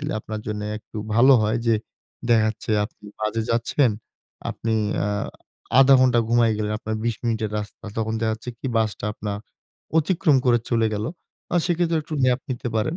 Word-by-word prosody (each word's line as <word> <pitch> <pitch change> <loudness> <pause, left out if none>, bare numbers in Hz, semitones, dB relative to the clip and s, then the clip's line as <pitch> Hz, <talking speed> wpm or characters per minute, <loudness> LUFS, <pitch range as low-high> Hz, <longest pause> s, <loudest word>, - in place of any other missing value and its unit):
দিলে 150 0 -3
আপনার 110 0 -6
জন্য 105 -1 -3 0.2
একটু 105 - -14 0.2
ভালো 130 +4 +7
হয় 110 +3 +1
যে, 115 - +5 0.5
দেখা 115 -2 +5
যাচ্ছে 110 0 -5
আপনি 105 -1 -12 0.2
বাজে 110 +1 0
যাচ্ছেন, 115 +2 +2 0.6
আপনি 115 -1 -2 0.3
আ - - 0 0.7
১/২ 135 0 +8
ঘন্টা 125 -2 +4
ঘুমায়ে 115 -2 +4
গেলেন, 105 0 -1
আপনার 110 0 -3
২০ 120 -2 +1
মিনিটের 110 -2 0
রাস্তা। 105 +1 -8
তখন 110 0 -1
দেখা 110 -1 +1
যাচ্ছে 115 +2 -7
কি - - -5
বাসটা 110 -2 0
আপনার 105 -1 -4 0.6
অতিক্রম 160 -2 +3
করে 120 -1 +5
চলে 115 -1 +3
গেলো। 105 +3 -2 0.4
আর 175 - +4
সেক্ষেত্রে 170 -1 +1
একটু 155 +1 -6
ন্যাপ 125 0 +3
নিতে 120 -1 -3
পারেন। 135 +10 0
115 Hz, 175 wpm, -23 LUFS, 110-130 Hz, 0.7 s, ১/২